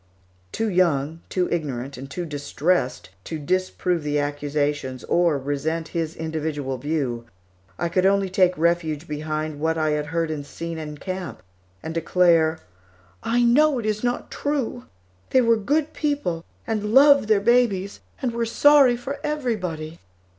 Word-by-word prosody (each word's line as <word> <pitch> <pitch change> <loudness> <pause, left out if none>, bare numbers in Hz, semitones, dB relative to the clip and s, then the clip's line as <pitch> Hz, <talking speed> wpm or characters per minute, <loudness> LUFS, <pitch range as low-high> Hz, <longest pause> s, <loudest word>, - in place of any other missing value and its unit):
Too 225 - -1
young, 165 -4 +1
too 180 -1 0
ignorant, 140 -5 -3
and 135 +2 -9
too 175 +5 -4
distressed 150 +4 -1
to 160 - -4
disprove 180 +2 -1
the 150 0 -1
accusations 145 -2 -2
or 170 -4 +2
resent 145 +4 -2
his 165 -2 -3
individual 155 -4 -3
view, 130 -5 -2 0.5
I - - -1
could 185 +2 +2
only 200 0 +2
take 185 -1 +2
refuge 165 -1 0
behind 155 0 -3
what 160 +1 0
I 155 -1 +1
had 150 0 -1
heard 165 +1 -1
and 150 -2 -4
seen 165 +3 -6
in 150 -1 -6
camp, 185 - -6 0.4
and 160 - -4
declare, 165 -1 +3 0.6
"I 240 +1 +1
know 280 +4 +4
it 235 - -3
is 215 +1 -1
not 245 0 -2
true; 270 -4 -2 0.4
they 260 - +4
were 230 -1 +4
good 285 +8 0
people, 285 - -2 0.2
and 215 0 -2
loved 280 -3 +7
their 215 -2 +4
babies, 205 -3 +2 0.2
and 250 - +1
were 230 0 -1
sorry 275 0 +5
for 275 +4 -6
everybody." 185 - -3
170 Hz, 150 wpm, -23 LUFS, 150-220 Hz, 0.6 s, loved